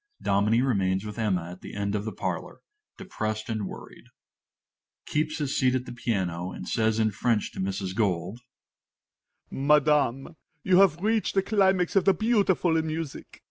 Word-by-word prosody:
Dominie 105 +5 +2
remains 95 -6 0
with 105 +2 -7
Emma 90 -6 -1
at 90 - -11
the - - -9
end 100 0 -2
of 105 0 -2
the 110 - -3
parlor, - - -5 0.4
depressed 110 - -4
and 110 -3 -2
worried._) - - -11
MR. - - -23
FORTE - - -53
(keeps 155 +1 -1
his 145 -3 -2
seat 130 0 +2
at 125 -1 -2
the 125 - -8
piano, 95 -7 -2
and - - -8
says 110 -1 +1
in 110 -1 +2
French 110 +1 0
to - - -10
Mrs. 95 0 -3
Gold). 100 0 -1 1.1
Madam, 145 0 +2 0.3
you 185 -1 +4
have 185 -3 +4
reached 220 -1 +1
the 195 - +3
climax 190 -4 +2
of 195 - +3
the 195 - +5
beautiful 200 -7 +2
in 160 0 -1
music. 155 -2 -6
120 Hz, 175 wpm, -26 LUFS, 100-160 Hz, 1.1 s, the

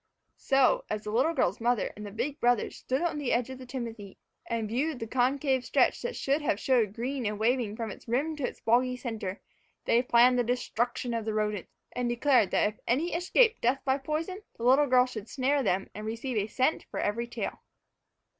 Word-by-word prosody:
So, 280 - +3
as 210 - -3
the 210 - -5
little 270 +9 +2
girl's 195 - +1
mother 240 -1 +1
and 210 - -8
the 205 - -6
big 265 +8 -3
brothers 240 -2 +1
stood 260 +6 -2
on 335 -3 -1
the 280 -4 -1
edge 245 +2 0
of 260 - -8
the 255 - -10
timothy 230 -6 -6 0.3
and 230 -2 -2
viewed 270 +7 -1
the 225 - -5
concave 260 +2 +1
stretch - - +2
that 485 0 -4
should 280 +3 0
have 240 -8 0
showed 230 -7 +2
green 255 +3 -3
and 210 0 -2
waving 225 -1 +1
from 225 -2 -4
its - - -12
rim 280 +7 0
to 290 - -5
the - - -6
boggy 250 +2 +3
center, 220 -6 -5 0.5
they 235 - +4
planned 245 0 +5
the - - +3
destruction 245 0 -1
of 230 -1 -1
the 215 0 -3
rodents, 210 -3 -1 0.2
and 245 -1 -2
declared 240 -3 +3
that - - +2
if 210 - -14
any 295 +9 +1
escaped 440 +7 +3
death 250 +3 +1
by 265 +1 +2
poison, 320 +8 -3 0.2
the 230 - -7
little 270 +4 +5
girl 250 -1 +5
should 225 -4 -8
snare 275 +2 +1
them 195 -5 0
and 210 +1 -6
receive 230 +3 -4
a 210 -1 0
cent 260 +7 0
for - - -5 0.2
each 235 - -5
tail. - - -4
245 Hz, 210 wpm, -29 LUFS, 225-270 Hz, 0.5 s, planned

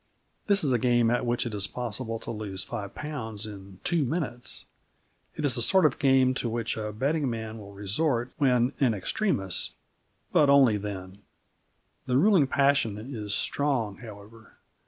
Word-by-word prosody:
This 200 -3 +4
is 140 - +1
a 125 - +2
game 120 -1 +3
at 120 0 0
which 120 +1 +1
it 120 - -4
is 100 -1 -1
possible 115 -1 -4
to - - -5
lose 100 -4 -4
five 105 -5 -6
pounds 115 -8 -5
in 100 -3 -10
two 170 -3 +1
minutes. 130 -4 -3 0.7
It 150 - -2
is 135 - +3
the 120 - 0
sort 190 +8 +4
of 145 - +2
game 130 -2 +4
to 120 - -2
which 115 0 -2
a 105 -1 -4
betting 140 +6 0
man 110 -1 -5
will 100 -1 -11
resort 120 +5 0
when 125 -2 +3
in 125 -6 +3
extremis, 95 - -1 0.6
but 145 - +4
only 135 -6 +6
then. 100 -2 -7 0.9
The 125 - +2
ruling 175 -3 +5
passion 135 -7 +2 0.2
is 105 -2 -3
strong, 130 -8 -1
however. 110 -1 -13
120 Hz, 165 wpm, -27 LUFS, 105-140 Hz, 0.9 s, only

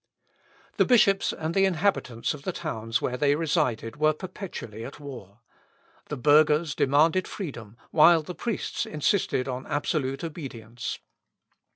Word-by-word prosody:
The - - +4
bishops 200 -6 +4
and 160 +1 -4
the 195 +1 +4
inhabitants 170 - 0
of 150 - -9
the 185 - -3
towns 115 -9 -3
where 125 - -1
they 145 +2 +3
resided 145 -8 -1
were 155 +1 +3
perpetually 155 - -7
at 135 - -9
war. 120 -7 -10 0.7
The - - -4
burghers 150 +3 +4
demanded 160 +7 +3
freedom, 120 - -7
while 165 +1 +6
the 180 - -7
priests 230 +2 -3
insisted 150 -4 0
on 130 0 -5
absolute 145 -1 -1
obedience. 125 -8 -6
150 Hz, 135 wpm, -26 LUFS, 125-170 Hz, 0.7 s, while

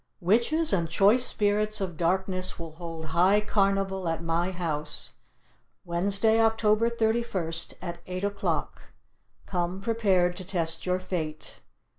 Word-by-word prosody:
Witches 235 - +2
and 170 -4 +1
Choice 205 +9 +4
Spirits 210 0 0
of 185 -4 -3
Darkness 185 +2 0
will 165 -2 -7
hold 165 0 -7
High 185 +5 +4
Carnival 195 -3 0
at 165 0 -2
my 165 +2 0
house, 160 -5 -2 0.7
..............Wednesday, 200 +6 +2
October 225 0 +3
31st, 220 -8 -1
at 170 -1 -5
eight 185 +1 -4
o'clock. 200 0 -2 0.6
Come 180 0 -2
prepared 195 -5 +1
to 190 - -5
test 165 -2 -2
your 180 0 +2
fate. 165 -4 -5
185 Hz, 125 wpm, -27 LUFS, 170-210 Hz, 0.7 s, Choice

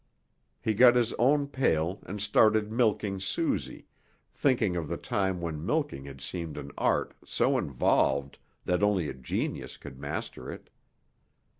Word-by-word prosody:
He 110 - 0
got 120 +3 +7
his 120 -2 +2
own 140 +4 +4
pail 95 - 0
and 105 +2 -5
started 105 +1 +3
milking 105 -4 +1
Susie, 95 - -2 0.5
thinking 120 -9 +2
of 85 -3 -2
the - - -3
time 95 -2 -1
when 80 -3 -4
milking 145 - -1
had 70 -1 -10
seemed 85 -4 -5
an - - -7
art - - +1
so - - +1
involved 70 +1 +1 0.3
that 90 +1 +1
only 100 -7 +2
a - - -4
genius 65 -1 -4
could 65 - -11
master 65 - -5
it. - - -11
95 Hz, 145 wpm, -29 LUFS, 80-115 Hz, 0.5 s, got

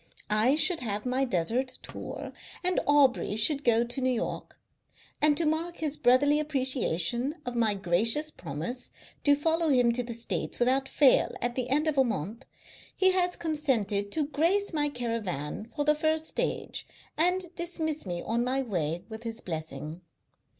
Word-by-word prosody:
I 220 +6 +3
should 335 +2 +3
have 210 -3 -4
my 255 +2 +1
desert 240 +6 -1
tour, - - -7 0.3
and 365 0 +2
Aubrey 280 -7 +3
should 280 +7 +1
go 235 -1 +4
to 240 +3 -4
New 255 - +2
York; 245 -3 -3 0.6
and 295 -1 +4
to 335 - +2
mark 325 +3 -1
his 305 -2 -2
brotherly 285 +4 +4
appreciation 260 - +1
of 245 - -4
my 225 -3 +2
gracious 220 - +2
promise 165 - -5 0.3
to 285 -1 +6
follow 325 +2 +1
him 245 -4 +4
to 240 +1 0
the 235 -1 -4
States 230 0 -3
without 265 +2 +1
fail 280 -3 +4
at 240 0 -2
the 250 -1 -3
end 295 +4 +2
of 305 -3 +1
a - - +6
month 220 - -4 0.5
he 375 0 +5
has 360 -1 +1
consented 245 -11 -1
to 310 -2 +1
grace 335 +8 +1
my 295 -1 +1
caravan 225 - -4
for 290 -2 -1
the 300 - +5
first 315 +1 0
stage, - - -2 0.3
and 360 +2 +1
dismiss 330 -3 -3
me 175 -3 -4
on 235 +1 0
my 265 +2 0
way 175 - -2
with 220 -1 -8
his 230 -1 -4
blessing. 160 - -6
255 Hz, 165 wpm, -28 LUFS, 225-305 Hz, 0.6 s, to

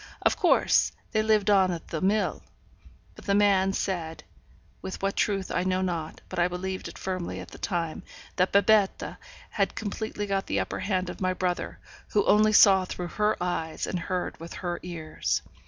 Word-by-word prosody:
Of - - +3
course, - - +3 0.2
they 215 - +2
lived 215 -1 +3
on 190 -2 +5
at 170 -2 -5
the 160 - -3
mill, 205 +3 +1 0.7
but - - -14
the 200 - +2
man 195 -2 +4
said 170 -4 -3 0.6
(with 190 - -6
what 195 0 -1
truth 195 -2 0
I - - 0
know 185 0 0
not, 165 -4 -3
but - - -5
I 175 - +4
believed 185 +1 -4
it - - -10
firmly 185 -2 -4
at - - -9
the - - -12
time) 170 -3 -2 0.4
that 185 0 +2
Babette 200 0 +3 0.3
had - - 0
completely 210 0 -4
got 195 -1 -1
the 100 - 0
upper 95 - -3
hand 185 -2 -1
of - - -11
my 185 0 +1
brother, 180 -1 -2 0.4
who 205 - +3
only 215 +1 +5
saw 195 -2 +7
through 180 -1 -5
her 210 +2 +1
eyes 175 -3 -2
and 180 - -3
heard 180 +1 -3
with 165 +1 -8
her 175 -1 -4
ears. 165 -3 -3
185 Hz, 185 wpm, -27 LUFS, 175-200 Hz, 0.7 s, saw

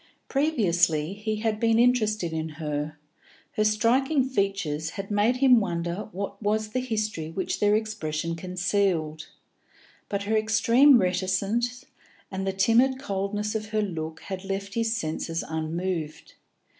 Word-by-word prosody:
Previously 180 - +2
he 215 +2 -3
had 220 -1 0
been 225 -1 +3
interested 215 -7 +2
in 160 0 -2
her; 150 0 -3 0.5
her 215 - 0
striking 255 +6 +2
features 195 - -1
had 195 0 -6
made 210 +4 +3
him 255 -2 +6
wonder 175 0 -3
what 200 +1 -5
was 215 +1 0
the 255 - -1
history 215 -10 -2
which 185 +3 -3
their 205 0 +4
expression 170 -7 -2
concealed; 180 -3 -1 0.8
but 200 0 -2
her 215 +2 0
extreme 230 +5 +5
reticence 200 +7 0 0.5
and 190 0 -3
the - - +2
timid 230 +7 +3
coldness 205 -2 -2
of 215 -1 -3
her 215 0 0
look 160 -4 -5
had 190 -1 -6
left 195 0 -4
his 230 0 0
senses 165 0 -3
unmoved. 160 0 -3
200 Hz, 135 wpm, -26 LUFS, 170-220 Hz, 0.8 s, him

